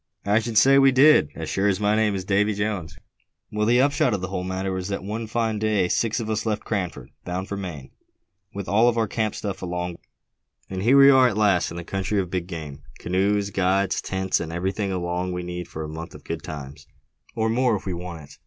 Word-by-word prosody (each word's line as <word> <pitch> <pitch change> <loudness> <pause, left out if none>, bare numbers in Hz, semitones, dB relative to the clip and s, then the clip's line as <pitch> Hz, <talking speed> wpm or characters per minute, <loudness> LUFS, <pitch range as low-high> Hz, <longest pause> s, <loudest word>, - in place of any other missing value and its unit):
"I 105 +2 +3
should 115 -1 -3
say 135 +4 +6
we 135 0 +6
did, 135 - +6
as 80 - -5
sure 95 +6 0
as 95 -1 +1
my 105 0 +2
name's 105 -4 0
Davy 105 +2 +2
Jones!" 100 -7 -3 0.5
"Well, 105 0 0
the 120 +1 +4
upshot 135 -4 +2
of 95 - -5
the 95 - -4
whole 90 -1 -3
matter 95 +1 -3
was 95 0 -3
that 100 -2 -3
one 110 +3 -4
fine 110 -1 -1
day 105 -4 +1
six 115 +4 0
of 115 - -4
us 110 -1 -1
left 110 -2 -2
Cranford, 95 -5 -3
bound 90 +2 -4
for 100 - -4
Maine, 85 -9 -7 0.6
with 100 -1 -6
all 115 +4 +4
our 115 -1 +1
camp 110 0 -2
stuff 100 -3 -5
along; 90 -1 -4 0.7
and 95 -1 -3
here 125 +7 +5
we 140 0 +9
are 130 -1 +6
at 110 -4 -2
last, 100 -5 +3
in 85 - -8
the 85 - -5
country 95 +3 -2
of 90 -2 -3
big 90 -2 -2
game, 75 -5 -7 0.2
canoes, 100 +2 0
guides, 95 0 +1
tents, 95 0 -1
and 80 -1 -5
everything 95 +4 -2
along 90 0 -2
we 90 0 -4
need 90 0 -5
for 80 - -6
a - - -5
month 80 +2 -8
of - - -12
good - - -5
times, 70 -1 -8 0.5
or 110 0 +1
more 120 0 +2
if 100 - -6
we 95 - -2
want 85 -2 -7
it." 70 - -14
95 Hz, 230 wpm, -24 LUFS, 90-110 Hz, 0.7 s, we